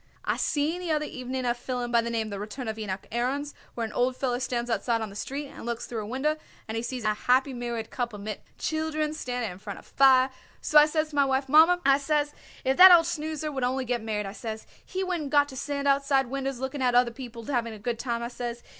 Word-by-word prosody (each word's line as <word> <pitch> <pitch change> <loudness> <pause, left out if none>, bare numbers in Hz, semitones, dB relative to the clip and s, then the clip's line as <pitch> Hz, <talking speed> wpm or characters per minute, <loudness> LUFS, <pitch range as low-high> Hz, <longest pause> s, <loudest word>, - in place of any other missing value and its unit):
I - - +1
seen 315 +4 0
the 355 - -4
other 305 -1 +1
evening 255 -1 -4
a 240 - +2
fillum 245 0 -4
by 235 -1 +4
the 235 - -3
name 225 -2 -2
The 200 - -4
Return 220 +5 -6
of 220 0 -4
Enoch 195 -3 -4
Aarons, 265 +5 -1 0.2
where 230 - -1
an 220 - -7
old 250 +1 +1
feller 250 -2 -1
stands 240 -1 -2
outside 230 0 0
on 220 -2 -4
the - - -12
street 275 +7 -4
and - - -11
looks 235 0 -3
through 230 -2 -4
a 205 - -6
winder, 280 +6 0 0.3
and 220 - -4
he 225 - -1
sees 240 0 -4
a 215 0 +2
happy 260 +5 +2
married 240 -2 -4
couple 240 -4 -3
mit 210 0 -6 0.2
children 315 -1 -1
sitting 245 -7 -3
in 180 - -11
front 205 0 -7
of - - -13
a - - -20
fire. 265 -1 +5 0.3
So 300 - +6
I 300 - +6
says 310 0 0
to 300 - -10
my 280 -1 +4
wife: 270 0 0
'Mommer,' 325 +5 +6
I 275 0 +5
says, 295 +1 0 0.3
'if 265 +1 +2
that 370 0 +11
old 340 -2 +8
snoozer 310 -2 -3
would 265 -3 -3
only 255 +1 0
get 245 -1 -1
married,' 215 -2 -2
I 195 - -5
says, 220 -1 -6 0.2
'he 380 0 -3
wouldn't 350 -6 -2
got 290 0 +4
to 265 - -9
stand 280 +1 -2
outside 275 -1 +3
winders 270 -2 -3
looking 265 +2 -4
at 250 -1 +2
other 245 -1 +4
people 235 -2 -9
having 235 -4 -1
a - - -9
good 230 +2 -3
time,' 235 -2 -2
I 235 - -3
says. 240 -1 -5
255 Hz, 255 wpm, -27 LUFS, 235-290 Hz, 0.3 s, that